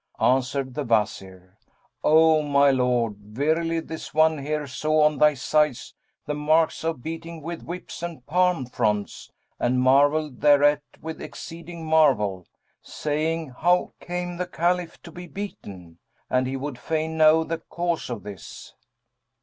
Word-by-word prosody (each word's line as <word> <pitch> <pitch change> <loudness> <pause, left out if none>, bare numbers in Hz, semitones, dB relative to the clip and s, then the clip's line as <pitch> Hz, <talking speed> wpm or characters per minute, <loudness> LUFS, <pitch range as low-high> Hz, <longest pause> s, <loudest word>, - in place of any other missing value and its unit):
Answered 130 +1 +1
the 150 - -3
Wazir 95 -5 -2 0.4
"O 160 0 +5
my 140 -1 +4
lord, 125 -5 +1
verily 155 +11 -1
this 160 -1 -8
one 155 -1 +4
here 150 +1 -2
saw 155 +3 +1
on 150 -2 +2
thy 150 -1 +5
sides 150 0 0 0.3
the 150 - -2
marks 155 +3 +1
of 160 -7 -3
beating 165 +1 -6
with 170 +1 -5
whips 175 0 -8
and 170 -7 -6
palm 180 -4 +1
fronds 105 -4 -2 0.3
and 125 +1 +1
marvelled 140 +2 +3
thereat 145 0 +5 0.2
with 160 0 -7
exceeding 165 0 -9
marvel, 125 - +2 0.3
saying, 155 +1 -2
'How 175 +5 +2
came 175 0 -4
the 180 0 -3
Caliph 175 0 -1
to 170 - -11
be 180 +2 -9
beaten?'; 95 - -9 0.3
and 130 0 +2
he 135 +1 -3
would 135 -2 -6
fain 160 +2 -2
know 160 0 +5
the 165 0 -4
cause 170 -2 -3
of 115 -6 -5
this." 100 -3 -10
150 Hz, 140 wpm, -24 LUFS, 130-165 Hz, 0.4 s, O